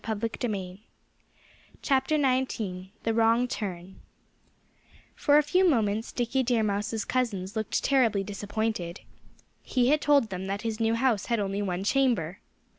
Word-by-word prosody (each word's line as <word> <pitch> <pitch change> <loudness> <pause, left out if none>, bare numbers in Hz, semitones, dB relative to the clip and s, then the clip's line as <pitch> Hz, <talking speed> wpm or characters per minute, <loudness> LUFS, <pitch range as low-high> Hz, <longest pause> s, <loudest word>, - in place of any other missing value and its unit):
XIX 220 0 -2 1.5
THE 260 -9 0 0.2
WRONG 230 +2 +3
TURN 190 -4 -5 1.1
For 290 0 +3
a 300 - +5
few 360 +5 +3
moments 220 -5 0
Dickie 245 +2 0
Deer 240 -3 +1
Mouse's 210 +1 -1
cousins 210 -6 -2
looked 220 -1 -1
terribly 230 -8 +2
disappointed. 205 -2 -3 0.6
He 250 -1 +1
had 300 +1 +3
told 280 -7 +3
them 185 +1 -4
that 200 +2 -3
his 225 -1 -3
new 225 0 +2
house 230 -4 +1
had 235 -2 +1
only 200 0 -2
one 185 -2 -2
chamber. 205 - +1
225 Hz, 125 wpm, -27 LUFS, 200-255 Hz, 1.5 s, a